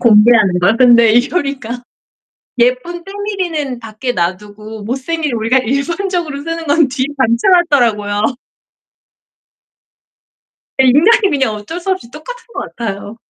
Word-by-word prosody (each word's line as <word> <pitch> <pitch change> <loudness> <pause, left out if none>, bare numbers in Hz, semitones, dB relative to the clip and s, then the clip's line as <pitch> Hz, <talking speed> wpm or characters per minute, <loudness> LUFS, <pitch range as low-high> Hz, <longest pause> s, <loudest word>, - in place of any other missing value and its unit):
공개하는 215 -4 +5
걸. 200 +5 +3
근데 235 -2 +5
이효리가 260 -2 -1 0.8
예쁜 255 +9 0
때밀이는 370 - -4
밖에 225 +2 -4
놔두고 205 +4 -4
못생긴 285 +5 -3
우리가 230 +3 +1
일반적으로 305 - -2
쓰는 330 +1 -5
건 290 0 +3
뒤에 260 0 -2
받쳐 235 +2 +1 0.2
놨더라고요. 215 -3 +1 2.5
예. 265 - +5
인간이 390 - +4
그냥 270 -7 0
어쩔 210 +12 -7
수 385 - -3
없이 370 -12 -3
똑같은 470 - -9
것 - - -6
같아요. 205 -1 -5
255 Hz, 285 characters per minute, -15 LUFS, 220-325 Hz, 2.5 s, 공개하는